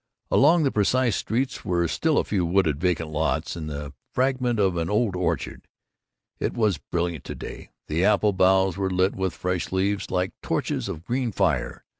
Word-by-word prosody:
Along 160 Hz, +4 st, +5 dB
the 135 Hz, -, +2 dB
precise 115 Hz, +2 st, +2 dB
streets 130 Hz, +4 st, -2 dB
were 85 Hz, -1 st, +1 dB
still 155 Hz, -, +1 dB
a -, -, +3 dB
few 95 Hz, -4 st, -1 dB
wooded 85 Hz, -4 st, +2 dB
vacant 85 Hz, -3 st, 0 dB
lots, 80 Hz, +2 st, -1 dB
and 80 Hz, -2 st, -5 dB
the 75 Hz, -1 st, -6 dB, 0.2 s
fragment 130 Hz, -2 st, +1 dB
of 95 Hz, -4 st, +2 dB
an 85 Hz, -1 st, -1 dB
old 105 Hz, -2 st, +1 dB
orchard. 90 Hz, 0 st, -2 dB, 0.7 s
It -, -, -1 dB
was 105 Hz, -9 st, +1 dB
brilliant 85 Hz, -2 st, -3 dB
to -, -, -6 dB
day; -, -, -8 dB, 0.2 s
the 80 Hz, +4 st, 0 dB
apple 105 Hz, 0 st, +3 dB
boughs 95 Hz, 0 st, +3 dB
were 95 Hz, -1 st, 0 dB
lit 95 Hz, +1 st, +1 dB
with 95 Hz, -2 st, -2 dB
fresh 90 Hz, -2 st, -2 dB
leaves 100 Hz, +2 st, 0 dB
like 90 Hz, 0 st, 0 dB
torches -, -, -2 dB
of 80 Hz, +2 st, -6 dB
green 125 Hz, -1 st, -1 dB
fire. 95 Hz, -6 st, 0 dB
95 Hz, 180 wpm, -25 LUFS, 85-110 Hz, 0.7 s, Along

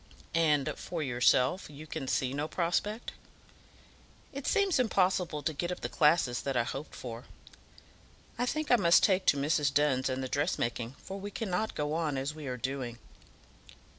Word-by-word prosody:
"And 150 Hz, -4 st, +2 dB
for 165 Hz, -3 st, -4 dB
yourself, 130 Hz, +6 st, +2 dB
you 150 Hz, +1 st, -10 dB
can 135 Hz, -3 st, -5 dB
see 130 Hz, 0 st, 0 dB
no 145 Hz, +2 st, -2 dB
prospect?" 190 Hz, +7 st, -1 dB, 1.2 s
"It 275 Hz, 0 st, -5 dB
seems 400 Hz, -7 st, +2 dB
impossible 185 Hz, -9 st, +1 dB
to 155 Hz, -, 0 dB
get 175 Hz, +5 st, -2 dB
up 180 Hz, -, -5 dB
the -, -, -3 dB
classes 150 Hz, -6 st, +3 dB
that 135 Hz, -2 st, -2 dB
I 120 Hz, -, +3 dB
hoped 135 Hz, +5 st, -6 dB
for. 120 Hz, -1 st, -7 dB, 1.1 s
I 245 Hz, +1 st, -1 dB
think 310 Hz, +3 st, -1 dB
I 245 Hz, -, +7 dB
must 170 Hz, -5 st, +5 dB
take 190 Hz, -2 st, +3 dB
to 145 Hz, -, +5 dB
Mrs. 145 Hz, 0 st, +2 dB
Dunn's 135 Hz, -2 st, +2 dB
and 130 Hz, 0 st, -2 dB
the -, -, -2 dB
dressmaking, 125 Hz, -5 st, -1 dB
for 195 Hz, +1 st, -8 dB
we 200 Hz, +1 st, -5 dB
cannot 210 Hz, 0 st, -2 dB
go 150 Hz, 0 st, -1 dB
on 155 Hz, -4 st, -1 dB
as 135 Hz, +3 st, -2 dB
we 155 Hz, -2 st, -8 dB
are 125 Hz, -1 st, -3 dB
doing." 125 Hz, -1 st, -4 dB
150 Hz, 170 wpm, -31 LUFS, 135-180 Hz, 1.2 s, I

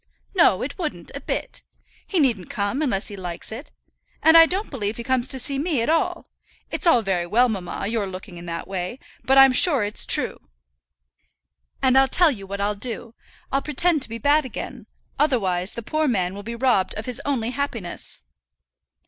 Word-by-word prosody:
"No, 185 Hz, -, +4 dB
it 280 Hz, +8 st, -6 dB
wouldn't, 315 Hz, -4 st, -4 dB
a -, -, -5 dB
bit. -, -, -4 dB, 0.5 s
He 375 Hz, -, 0 dB
needn't 235 Hz, -, +1 dB
come, 205 Hz, +8 st, -2 dB
unless 225 Hz, -9 st, -1 dB
he 205 Hz, -, -7 dB
likes 180 Hz, -1 st, -4 dB
it. 240 Hz, +7 st, -8 dB, 0.5 s
And 320 Hz, +1 st, +6 dB
I 330 Hz, 0 st, +9 dB
don't 385 Hz, +5 st, -3 dB
believe 215 Hz, -6 st, -3 dB
he 235 Hz, -, -5 dB
comes 260 Hz, 0 st, 0 dB
to 265 Hz, -, -1 dB
see 275 Hz, +2 st, 0 dB
me 305 Hz, -3 st, 0 dB
at 270 Hz, -, +1 dB
all. 345 Hz, +1 st, 0 dB, 0.4 s
It's -, -, 0 dB
all 245 Hz, -9 st, +5 dB
very 180 Hz, -3 st, -1 dB
well, 240 Hz, +7 st, +3 dB
mamma, 195 Hz, -2 st, -4 dB
your 215 Hz, -1 st, -1 dB
looking 185 Hz, 0 st, -9 dB
in 175 Hz, -, -10 dB
that 170 Hz, 0 st, -5 dB
way; 190 Hz, +4 st, -4 dB, 0.3 s
but 270 Hz, +1 st, +3 dB
I'm 270 Hz, -1 st, +8 dB
sure 275 Hz, -, +5 dB
it's 205 Hz, +1 st, -2 dB
true. -, -, +2 dB, 1.4 s
And 260 Hz, -1 st, +4 dB
I'll 270 Hz, -, +4 dB
tell 335 Hz, +4 st, +5 dB
you 200 Hz, -7 st, -8 dB
what 200 Hz, +1 st, -5 dB
I'll 205 Hz, +1 st, 0 dB
do, 230 Hz, +2 st, -5 dB, 0.4 s
I'll 275 Hz, -, +1 dB
pretend 310 Hz, +1 st, +2 dB
to -, -, 0 dB
be 230 Hz, -, -5 dB
bad 290 Hz, +6 st, +3 dB
again, 260 Hz, -, -7 dB, 0.3 s
otherwise 195 Hz, -11 st, +1 dB
the 235 Hz, -, -7 dB
poor 310 Hz, +6 st, 0 dB
man 185 Hz, -7 st, 0 dB
will 200 Hz, -, -7 dB
be 230 Hz, +3 st, -6 dB
robbed 235 Hz, -6 st, +1 dB
of 215 Hz, -, -5 dB
his 250 Hz, -2 st, +1 dB
only 245 Hz, -5 st, -1 dB
happiness." 240 Hz, -, -5 dB
235 Hz, 195 wpm, -23 LUFS, 200-280 Hz, 1.4 s, I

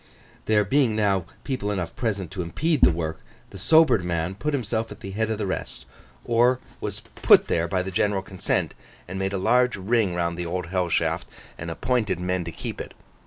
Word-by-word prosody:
There 105 Hz, -1 st, +3 dB
being 125 Hz, 0 st, +2 dB
now 100 Hz, -4 st, +1 dB, 0.2 s
people 130 Hz, -7 st, -2 dB
enough 90 Hz, -5 st, -3 dB
present 100 Hz, -7 st, -2 dB
to 95 Hz, -1 st, -3 dB
impede 145 Hz, -, 0 dB
the -, -, +8 dB
work, 80 Hz, -2 st, -3 dB, 0.3 s
the 95 Hz, -, -9 dB
sobered 155 Hz, -, +5 dB
man 85 Hz, 0 st, -1 dB
put 150 Hz, +10 st, -2 dB
himself 115 Hz, -4 st, -2 dB
at -, -, -10 dB
the 95 Hz, -, -6 dB
head 110 Hz, +2 st, -1 dB
of 110 Hz, -, -1 dB
the 105 Hz, -, -2 dB
rest, 95 Hz, -, -4 dB, 0.4 s
or 120 Hz, +2 st, +3 dB, 0.2 s
was -, -, -4 dB
put -, -, +4 dB
there 85 Hz, 0 st, +1 dB
by 90 Hz, +2 st, 0 dB
the 95 Hz, -, -5 dB
general 100 Hz, 0 st, +1 dB
consent, 95 Hz, -1 st, -1 dB, 0.3 s
and 95 Hz, +2 st, -5 dB
made 95 Hz, 0 st, -1 dB
a 100 Hz, -, -1 dB
large 125 Hz, +6 st, +3 dB
ring 100 Hz, -1 st, +1 dB
round 85 Hz, 0 st, -1 dB
the 90 Hz, -, -2 dB
Old 90 Hz, +2 st, -2 dB
Hell 90 Hz, 0 st, -1 dB
Shaft, -, -, 0 dB, 0.3 s
and 85 Hz, -, -6 dB
appointed 105 Hz, 0 st, 0 dB
men 90 Hz, 0 st, -1 dB
to 85 Hz, -, -5 dB
keep -, -, -6 dB
it. -, -, -9 dB
95 Hz, 205 wpm, -25 LUFS, 90-115 Hz, 0.4 s, the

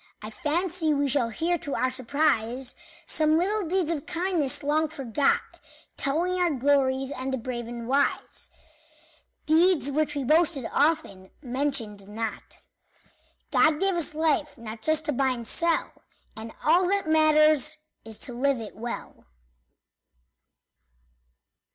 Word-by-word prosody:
I 215 Hz, -, -7 dB
fancy 320 Hz, -, 0 dB
we 285 Hz, 0 st, +1 dB
shall 265 Hz, -3 st, +2 dB
hear 335 Hz, +9 st, -1 dB
to 290 Hz, -4 st, -4 dB
our 255 Hz, 0 st, 0 dB
surprise 255 Hz, -2 st, 0 dB, 0.3 s
Some 310 Hz, 0 st, +2 dB
little 395 Hz, +2 st, 0 dB
deeds 360 Hz, -3 st, +1 dB
of 300 Hz, -4 st, -4 dB
kindness, 330 Hz, -6 st, 0 dB
long 305 Hz, +2 st, +1 dB
forgot, 275 Hz, -3 st, -1 dB, 0.4 s
Telling 350 Hz, +6 st, 0 dB
our 350 Hz, -, +3 dB
glory, 270 Hz, -1 st, +1 dB
and 260 Hz, +1 st, -4 dB
the 265 Hz, -, -1 dB
brave 240 Hz, -1 st, -5 dB
and 235 Hz, -1 st, -7 dB
wise 280 Hz, +2 st, -1 dB, 1.0 s
Deeds 320 Hz, -2 st, +3 dB
which 300 Hz, +1 st, 0 dB
we 285 Hz, -, -2 dB
boasted 305 Hz, -1 st, +2 dB
often, 280 Hz, -, 0 dB
mentioned 245 Hz, -6 st, -2 dB
not. 220 Hz, +2 st, -6 dB, 0.9 s
God 305 Hz, -1 st, +4 dB
gave 390 Hz, 0 st, +2 dB
us 335 Hz, -3 st, -1 dB
life 310 Hz, -1 st, 0 dB
not 225 Hz, -1 st, -9 dB
just 315 Hz, +4 st, +1 dB
to 300 Hz, -, +1 dB
buy 270 Hz, 0 st, +1 dB
and 235 Hz, -3 st, -4 dB
sell, 335 Hz, 0 st, +1 dB, 0.4 s
And 225 Hz, +1 st, -8 dB
all 350 Hz, +4 st, +4 dB
that 395 Hz, -2 st, 0 dB
matters 310 Hz, -1 st, +4 dB, 0.3 s
is 220 Hz, -1 st, -6 dB
to 255 Hz, -, -5 dB
live 265 Hz, +1 st, 0 dB
it 220 Hz, -2 st, -8 dB
well. 235 Hz, +3 st, -7 dB
285 Hz, 135 wpm, -26 LUFS, 250-320 Hz, 1.0 s, God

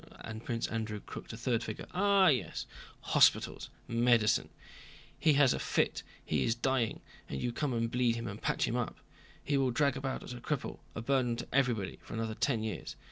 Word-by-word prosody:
and 110 Hz, 0 st, -7 dB
Prince 115 Hz, -1 st, -2 dB
Andrew 110 Hz, -2 st, -3 dB
crooked -, -, -9 dB
a 115 Hz, -, -7 dB
third 115 Hz, -1 st, 0 dB
finger. 110 Hz, -, -5 dB
"Ah, 200 Hz, 0 st, +5 dB
yes, 130 Hz, -5 st, 0 dB, 0.4 s
hospitals, -, -, +3 dB, 0.2 s
medicine. 115 Hz, -2 st, +3 dB, 0.7 s
He 155 Hz, -2 st, +5 dB
has 140 Hz, -2 st, +5 dB
a -, -, -2 dB
fit, -, -, 0 dB, 0.2 s
he 75 Hz, -3 st, +1 dB
is 115 Hz, -, +1 dB
dying, 120 Hz, -2 st, 0 dB, 0.3 s
and 70 Hz, -, -3 dB
you 120 Hz, -, -2 dB
come 145 Hz, +2 st, -1 dB
and 115 Hz, -1 st, 0 dB
bleed 125 Hz, -2 st, +2 dB
him 115 Hz, 0 st, -4 dB
and 100 Hz, +1 st, -6 dB
patch -, -, +1 dB
him 120 Hz, -, -1 dB
up. 125 Hz, -2 st, -2 dB, 0.5 s
He 145 Hz, -, +1 dB
will 135 Hz, -1 st, +2 dB
drag 140 Hz, +2 st, +2 dB
about 135 Hz, -1 st, -3 dB
as -, -, -7 dB
a 120 Hz, -, -8 dB
cripple, 150 Hz, 0 st, -3 dB, 0.2 s
a 115 Hz, -, -4 dB
burden 125 Hz, -2 st, +2 dB
to 120 Hz, -, -6 dB
everybody, 125 Hz, -8 st, +1 dB
for -, -, -8 dB
another 115 Hz, -1 st, -2 dB
ten 110 Hz, 0 st, 0 dB
years. 110 Hz, -7 st, -4 dB
120 Hz, 195 wpm, -32 LUFS, 115-135 Hz, 0.7 s, Ah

